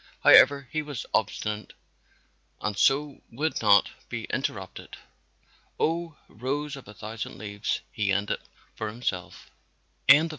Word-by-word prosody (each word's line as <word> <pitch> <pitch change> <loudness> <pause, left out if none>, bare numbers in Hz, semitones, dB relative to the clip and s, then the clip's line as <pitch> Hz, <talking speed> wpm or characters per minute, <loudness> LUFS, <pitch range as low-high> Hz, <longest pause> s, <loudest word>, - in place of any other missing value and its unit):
However, 140 0 +7
he 155 - 0
was 145 -5 -6
obstinate 105 0 -1 0.9
and 105 -1 -2
so 140 +7 +2
would 150 +7 -1
not 100 -2 +5 0.2
be - - -4
interrupted. - - -4 0.8
"Oh, 165 -1 0
Rose 140 +5 -3
of 135 - -11
a 105 - -10
Thousand 110 +2 -6
Leaves," 100 0 -3
he 105 -3 0
ended 100 +1 0 0.3
for 110 - -4
himself. 105 -5 -4
115 Hz, 115 wpm, -27 LUFS, 105-145 Hz, 0.9 s, However